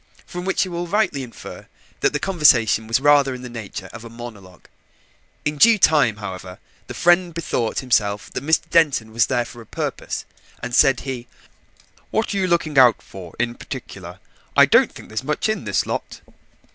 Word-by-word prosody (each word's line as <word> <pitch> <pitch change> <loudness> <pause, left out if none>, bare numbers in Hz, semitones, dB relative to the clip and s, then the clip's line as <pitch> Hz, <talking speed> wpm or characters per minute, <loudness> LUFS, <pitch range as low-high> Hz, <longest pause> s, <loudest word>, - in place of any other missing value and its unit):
From 180 0 -7
which 190 0 +1
you 185 - -8
will 175 0 -4
rightly 190 -7 0
infer 125 -3 -10 0.3
that - - +2
the - - -1
conversation 125 - +3
was 115 +2 +2
rather 140 -2 +4
in 125 - -10
the 125 - -7
nature 105 -4 -7
of 115 0 -9
a 115 - -10
monologue. 110 -6 -11 0.8
In 150 0 -1
due 230 +4 +7
time, 145 - +4
however, 95 -3 -8 0.3
the - - -8
friend 175 -1 +3
bethought 125 -8 -2
himself 105 -5 0
that - - -4
Mr. 160 +2 +1
Denton 145 -10 +2
was 115 +1 +3
there 120 -2 0
for 120 - -11
a - - -13
purpose, - - -4 0.4
and 125 0 -5
said 135 +1 +4
he, 125 -3 -6 0.8
"What 220 -1 -1
are - - -2
you 190 -1 +1
looking 160 -5 +1
out 125 -4 +6
for 90 -4 -11
in 120 0 -1
particular? - - -9 0.4
I - - +9
don't - - +4
think - - -13
there's 110 +3 -4
much 150 +7 -1
in 215 0 -2
this - - 0
lot." - - -5
130 Hz, 185 wpm, -21 LUFS, 115-165 Hz, 0.8 s, I